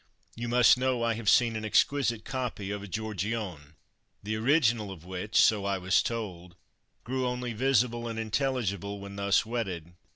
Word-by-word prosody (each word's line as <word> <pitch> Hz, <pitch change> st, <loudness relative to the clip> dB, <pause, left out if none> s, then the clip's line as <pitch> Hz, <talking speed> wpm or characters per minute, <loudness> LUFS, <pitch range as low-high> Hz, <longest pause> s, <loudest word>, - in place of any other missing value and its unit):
(You 120 Hz, +1 st, -4 dB
must 125 Hz, +1 st, +5 dB
know 130 Hz, -2 st, 0 dB
I 115 Hz, 0 st, +2 dB
have 110 Hz, -3 st, -1 dB
seen 115 Hz, -2 st, +4 dB
an 110 Hz, -, -4 dB
exquisite 115 Hz, 0 st, +1 dB
copy 125 Hz, -6 st, -4 dB
of 105 Hz, 0 st, -4 dB
a 100 Hz, -, -8 dB
Giorgione, 100 Hz, -6 st, -4 dB, 0.5 s
the 110 Hz, +2 st, -2 dB
original 115 Hz, -3 st, +2 dB
of 90 Hz, -4 st, -10 dB
which 95 Hz, +4 st, -1 dB
so 105 Hz, -3 st, +4 dB
I 100 Hz, -1 st, 0 dB
was 95 Hz, +1 st, +2 dB
told 90 Hz, -7 st, -5 dB, 0.5 s
grew 130 Hz, +1 st, -1 dB
only 125 Hz, -1 st, -3 dB
visible 120 Hz, -1 st, +1 dB
and 115 Hz, -1 st, -5 dB
intelligible 110 Hz, -4 st, -2 dB
when 100 Hz, 0 st, -9 dB
thus 100 Hz, +1 st, +2 dB
wetted.) 95 Hz, -8 st, -4 dB
110 Hz, 165 wpm, -29 LUFS, 100-120 Hz, 0.5 s, must